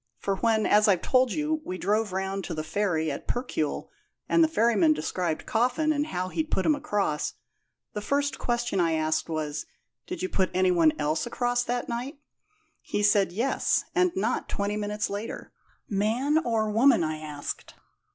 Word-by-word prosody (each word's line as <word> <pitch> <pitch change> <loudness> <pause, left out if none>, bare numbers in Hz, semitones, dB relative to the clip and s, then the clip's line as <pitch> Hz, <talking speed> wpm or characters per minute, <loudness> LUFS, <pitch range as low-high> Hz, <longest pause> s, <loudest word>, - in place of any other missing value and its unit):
For 195 -1 -2
when, 220 0 +2
as 210 +1 +5
I've 185 -4 +3
told 255 -2 +3
you, 310 +3 -1
we 185 - -5
drove 210 +2 0
around 190 +1 -2
to 170 - -4
the 155 - -3
ferry 160 -2 0
at 140 - -7
Percuil, 240 - -2 0.4
and 335 - +4
the - - +5
ferryman 220 - +3
described 160 +1 -2
Coffin 255 +7 +1
and 295 0 -1
how 185 -7 -3
he'd 315 - -2
put 190 - 0
him 310 - +5
across, 205 - -1 0.6
the 210 - -3
first 280 +4 0
question 240 -5 -1
I 165 -2 +2
asked 155 +1 0
was 150 -2 -3 0.4
'Did 360 0 -5
you - - +1
put 190 - +1
any 185 0 +3
one 165 -3 +5
else 155 +7 -1
across 245 0 0
that 245 0 -2
night?' 245 +5 -4 0.6
He 205 - -2
said, 205 -2 +4
'Yes; 235 +9 +1
and 360 0 +3
not 380 - -1
twenty 205 0 -1
minutes 210 +1 -2
later.' 205 +3 -6 0.4
'Man 230 +9 +1
or 220 -4 0
woman?' 230 -2 +5
I 155 -1 -2
asked. 150 -2 -6
210 Hz, 175 wpm, -27 LUFS, 175-245 Hz, 0.6 s, as